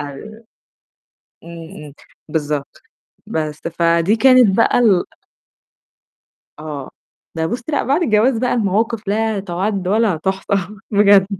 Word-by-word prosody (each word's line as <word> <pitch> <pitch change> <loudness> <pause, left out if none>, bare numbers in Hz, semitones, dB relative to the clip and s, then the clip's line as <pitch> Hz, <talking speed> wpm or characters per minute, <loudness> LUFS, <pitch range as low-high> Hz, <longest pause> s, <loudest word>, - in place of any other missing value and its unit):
امم، 145 -2 -7 1.3
امم 165 -3 -10 0.4
بالضبط. 150 -2 -4 0.4
بس، 155 -1 -4 0.2
فدي 170 +5 +2
كانت 250 -4 +5
بقى 230 - +3
ال 205 -7 +3 1.5
آه، 150 -3 -7 0.4
ده 160 0 -1
بُصّي، 240 +7 -4
لأ - - +1
بعد 290 +6 +1
الجواز 230 -1 +2
بقى 250 +1 0
المواقف 220 0 -1
لا 220 0 0
تُعَدّ 190 +1 -3
ولا 215 -3 +2
تُحصَى 190 +4 -2 0.4
بجد. 200 -2 +5
195 Hz, 110 wpm, -18 LUFS, 160-220 Hz, 1.5 s, كانت